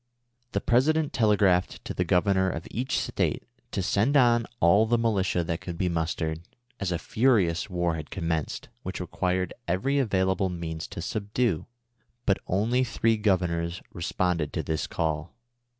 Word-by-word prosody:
The - - 0
President 150 +5 +2
telegraphed 100 -5 +2
to - - -4
the 90 - 0
Governor 95 +2 +2
of 80 -1 -5
each 130 +3 -1
State - - -1 0.3
to 95 - -2
send 110 +10 +2
on 120 -3 +4
all 100 +6 +5
the 120 +1 +3
militia 100 -6 +1
that 85 0 -3
could 85 -2 -6
be 90 0 +1
mustered, 80 -1 -2 0.4
as 95 -2 -1
a 85 - +1
furious 110 -7 +2
war 85 -2 0
had 80 -2 -6
commenced, 80 -4 -3
which - - -5
required 90 0 -1
every 115 +12 +1
avail 95 -6 +2
al)le 95 -2 0
means 80 -1 -5
to - - -6
subdue; 105 -3 -1 0.6
but 100 - +2
only 115 +7 +2
three 115 -2 +1
Governors 90 -5 0
responded 85 -2 -1
to - - -2
this 80 -1 -2
call. 80 +2 -2
95 Hz, 155 wpm, -27 LUFS, 85-110 Hz, 0.6 s, all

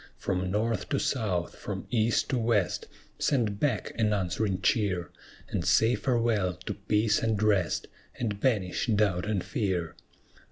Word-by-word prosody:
From 90 -1 -1
North 105 +1 -1
to - - +1
South, 95 -9 -1
from - - -5
East 115 -1 +2
to 130 - +1
West: 110 -5 +1 0.3
Send 110 -8 +1
back 145 -3 0
an 105 -1 +3
answering 95 0 0
cheer, 95 -6 +1 0.4
And - - -1
say 115 +2 +4
farewell 115 -8 +1
to - - -2
peace 105 +1 +1
and 110 -3 +1
rest, 100 -5 +2 0.3
And 105 -4 -2
banish 105 -7 0
doubt 105 -4 +2
and 100 -4 0
fear. 90 -3 -2
105 Hz, 145 wpm, -28 LUFS, 95-115 Hz, 0.4 s, say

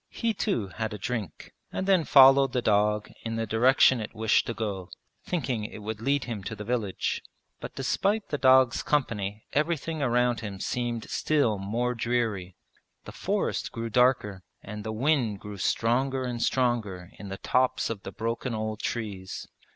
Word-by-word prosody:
He 230 -1 -1
too 120 - -1
had 110 +3 -4
a - - -6
drink, 105 -4 -5 0.2
and 190 - -2
then 190 -5 +3
followed 135 -1 +7
the 125 - +1
dog 105 0 +2
in 115 0 -3
the 115 0 -1
direction 125 +2 +4
it 110 - -7
wished 110 -1 +2
to 115 - -2
go, 100 -5 -4 0.3
thinking 130 -11 -2
it 105 0 -7
would 110 0 -5
lead 140 +2 +1
him 115 -5 -5
to 110 - -4
the 105 - -7
village. 110 -4 -1 0.4
But - - -8
despite 210 +2 0
the 145 - -2
dog's 130 -2 +5
company 105 -8 -1
everything 160 +1 0
around 125 -2 +2
him 100 -4 -6
seemed 120 0 -2
still 140 -10 +1
more 115 +5 -1
dreary. 115 -6 -1 0.5
The - - -8
forest - - -2
grew 115 0 -5
darker 115 -6 +2 0.2
and 105 +1 -7
the 110 - -3
wind 120 -3 +1
grew 105 0 -8
stronger 130 +6 +1
and 120 -2 -3
stronger 110 -8 0
in 100 - -8
the 95 - -5
tops 125 +3 +1
of 105 -3 -5
the - - -7
broken 115 +1 -3
old 110 0 -3
trees. 100 -5 -4
115 Hz, 170 wpm, -27 LUFS, 105-130 Hz, 0.5 s, followed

